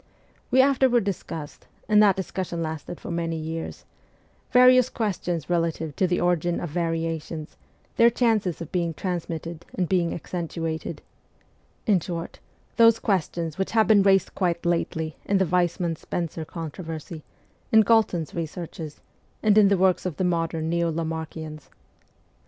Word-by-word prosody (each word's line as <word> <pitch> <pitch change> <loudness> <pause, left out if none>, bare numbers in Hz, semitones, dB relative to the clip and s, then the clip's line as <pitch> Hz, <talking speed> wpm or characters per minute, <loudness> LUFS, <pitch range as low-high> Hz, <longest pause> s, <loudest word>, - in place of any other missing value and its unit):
We 260 +1 +6
after 270 -1 +3
ward 240 -2 +3
discussed 165 -6 -6 0.2
and 210 -1 +5
that 200 -3 +5
discussion 185 -3 -3
lasted 160 +2 -5
for - - -7
many 165 -1 -2
years 160 +1 -5 0.7
various 255 0 +6
questions 180 - -2
relative 165 -3 -1
to 185 - +3
the 175 0 0
origin 175 -1 +1
of 175 - -5
variations, 165 -2 -3 0.4
their 235 0 +7
chances 220 -8 +1
of 165 - -7
being 170 -3 -1
transmitted 170 -2 -4
and 180 -2 0
being 175 -2 +1
accentuated; 165 -2 -4 0.8
in 200 -4 +4
short, 170 0 -6 0.4
those 230 -1 +7
questions 170 -5 -1
which 190 - -1
have 220 -1 +5
been 210 -1 +6
raised 195 -1 +3
quite 175 -2 -1
lately 160 -2 -1
in 200 - +2
the 190 - +3
Weismann 175 -1 0
Spencer 165 0 -4
controversy, 160 0 -7 0.5
in 220 - +7
Galton's 210 -7 +2
researches, 165 -2 -6 0.4
and 210 -1 +4
in 210 -2 +7
the 200 0 +3
works 185 0 +2
of 170 - -5
the - - 0
modern 165 -2 0
Neo 170 0 +1
Lamarckians. 160 -1 -5
170 Hz, 145 wpm, -25 LUFS, 165-195 Hz, 0.8 s, their